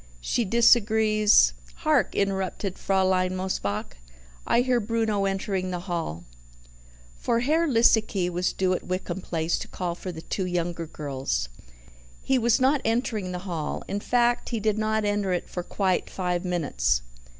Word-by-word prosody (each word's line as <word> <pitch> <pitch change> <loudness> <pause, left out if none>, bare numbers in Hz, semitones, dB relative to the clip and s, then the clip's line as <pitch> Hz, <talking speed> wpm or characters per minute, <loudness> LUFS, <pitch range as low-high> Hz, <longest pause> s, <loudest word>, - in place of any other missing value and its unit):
She 230 - 0
disagrees 215 - +4
" - - -21
"Hark!" - - +2
interrupted 195 -1 -2
Fraulein 185 -1 +1
Mosebach. 105 - -3 0.5
"I 235 - +4
hear 250 -1 +2
Bruno 220 -2 0
entering 195 -1 -1
the 180 -1 -3
hall." 165 - -4 1.0
For 235 - +1
Herr 315 +6 +2
Liesecke 220 - +3
was 180 +1 0
due 185 -1 0
at 180 - -2
Wickham 185 0 -3
Place 165 -1 -1
to - - -6
call 180 -2 -3
for 180 +1 -6
the 160 -1 -9
two 190 -2 -3
younger 170 -1 -2
girls. 135 - -3 0.7
He 265 -1 +1
was 235 +1 +3
not 270 +2 +3
entering 225 -4 -1
the 180 +1 -6
hall 165 -5 -3
in 200 - -2
fact, 240 +2 +1
he 230 - -2
did 215 0 0
not 220 0 0
enter 205 -2 0
it 175 - -2
for 180 - -4
quite 185 +1 -1
five 180 -2 -2
minutes. 60 - 0
190 Hz, 155 wpm, -26 LUFS, 175-220 Hz, 1.0 s, disagrees